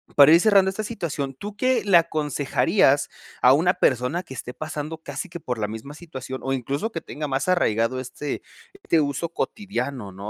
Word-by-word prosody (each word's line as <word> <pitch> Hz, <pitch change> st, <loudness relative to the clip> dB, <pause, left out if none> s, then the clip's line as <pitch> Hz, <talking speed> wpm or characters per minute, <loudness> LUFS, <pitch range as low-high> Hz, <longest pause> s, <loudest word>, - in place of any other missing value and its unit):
para 145 Hz, +1 st, +8 dB
ir 165 Hz, -, +8 dB
cerrando 195 Hz, -1 st, +5 dB
esta 195 Hz, +3 st, -4 dB
situación, 155 Hz, -11 st, -4 dB
¿tú 205 Hz, +9 st, -8 dB
qué 255 Hz, +3 st, +2 dB
le 195 Hz, -4 st, +6 dB
aconsejarías 150 Hz, -, +2 dB, 0.3 s
a 125 Hz, -, +7 dB
una 175 Hz, +6 st, +3 dB
persona 135 Hz, +2 st, +1 dB
que -, -, -10 dB
esté 125 Hz, -, -6 dB
pasando 155 Hz, +1 st, -5 dB
casi 185 Hz, +3 st, -6 dB
que 175 Hz, -, -7 dB
por 125 Hz, -6 st, -4 dB
la 105 Hz, -, 0 dB
misma 110 Hz, +7 st, -8 dB
situación, 130 Hz, -6 st, -7 dB
o 135 Hz, -, -1 dB
incluso 140 Hz, -, -2 dB
que 165 Hz, -, -4 dB
tenga 150 Hz, +1 st, -5 dB
más 135 Hz, +2 st, -1 dB
arraigado 120 Hz, -7 st, +2 dB
este 130 Hz, +3 st, -5 dB, 0.3 s
este 170 Hz, -, +1 dB
uso 145 Hz, +3 st, -2 dB
cotidiano, 140 Hz, -, -4 dB
¿no?, 100 Hz, +3 st, -7 dB
150 Hz, 185 wpm, -24 LUFS, 130-175 Hz, 0.3 s, para